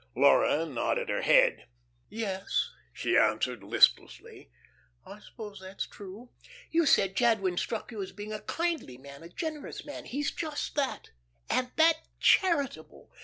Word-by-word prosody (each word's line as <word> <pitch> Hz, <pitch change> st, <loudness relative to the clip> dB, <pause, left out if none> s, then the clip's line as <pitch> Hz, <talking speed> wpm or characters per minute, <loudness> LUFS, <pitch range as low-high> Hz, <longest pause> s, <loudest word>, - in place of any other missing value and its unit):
Laura 160 Hz, +2 st, +4 dB
nodded 135 Hz, -7 st, -2 dB
her -, -, -1 dB
head. -, -, +4 dB, 0.4 s
"Yes," 195 Hz, -4 st, -2 dB, 0.2 s
she -, -, -1 dB
answered, -, -, +2 dB
listlessly, -, -, +2 dB, 0.6 s
"I 205 Hz, -, -11 dB
suppose 210 Hz, -2 st, -10 dB
that's 190 Hz, +1 st, -6 dB
true." 205 Hz, +5 st, -11 dB, 0.4 s
"You 330 Hz, -1 st, +2 dB
said 195 Hz, -7 st, +3 dB
Jadwin 220 Hz, -6 st, +2 dB
struck 225 Hz, +4 st, -3 dB
you 215 Hz, -3 st, -5 dB
as 190 Hz, -, -6 dB
being 210 Hz, +1 st, -7 dB
a 215 Hz, -, -5 dB
kindly 330 Hz, -, -3 dB
man, 140 Hz, +1 st, -12 dB
a 165 Hz, -, -11 dB
generous 310 Hz, -, -6 dB
man. 290 Hz, -, -8 dB
He's 280 Hz, +2 st, -2 dB
just 310 Hz, -3 st, -4 dB
that, 280 Hz, -3 st, -2 dB, 0.4 s
and 250 Hz, 0 st, 0 dB
that 320 Hz, 0 st, +5 dB, 0.2 s
charitable! 285 Hz, -, +1 dB
220 Hz, 140 wpm, -29 LUFS, 190-290 Hz, 0.6 s, that